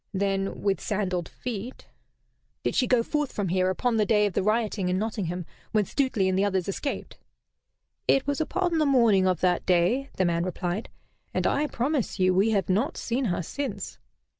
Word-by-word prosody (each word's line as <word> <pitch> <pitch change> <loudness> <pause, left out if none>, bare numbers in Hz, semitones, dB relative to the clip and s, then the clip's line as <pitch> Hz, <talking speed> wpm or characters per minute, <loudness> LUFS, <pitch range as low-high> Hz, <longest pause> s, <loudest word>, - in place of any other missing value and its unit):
Then 195 0 -1
with 200 -1 +1
sandalled 185 -4 -2
feet 240 0 -6 0.4
" - - -47
"Did - - 0
she 255 - +2
go 245 -2 +3
forth 295 +1 -1
from 200 -3 -2
here 185 +1 +2
upon 230 +5 0
the 215 - +4
day 210 -1 +4
of 205 - -1
the - - +1
rioting 215 -2 0
in 180 - +1
Nottingham, 185 -5 -2 0.3
when 210 -2 +3
Stuteley 245 -5 0
and 185 - +1
the 195 - +2
others 190 -3 0
escaped?" 275 +8 -4 0.9
"It 270 - +4
was 285 +2 -1
upon 345 +1 0
the 305 - +3
morning 230 -8 +4
of 180 -3 +1
that 180 -1 +2
day," 185 +10 +2
the 185 - +2
man 170 -1 +1
replied; 180 +3 -3 0.5
"and - - 0
I 300 +1 +2
promise 265 -3 -1
you, 185 -1 +3
we 195 +4 +3
have 200 -6 +1
not 210 +9 0
seen 250 +3 -1
her 180 -4 -1
since." 280 - -5
205 Hz, 190 wpm, -26 LUFS, 185-250 Hz, 0.9 s, the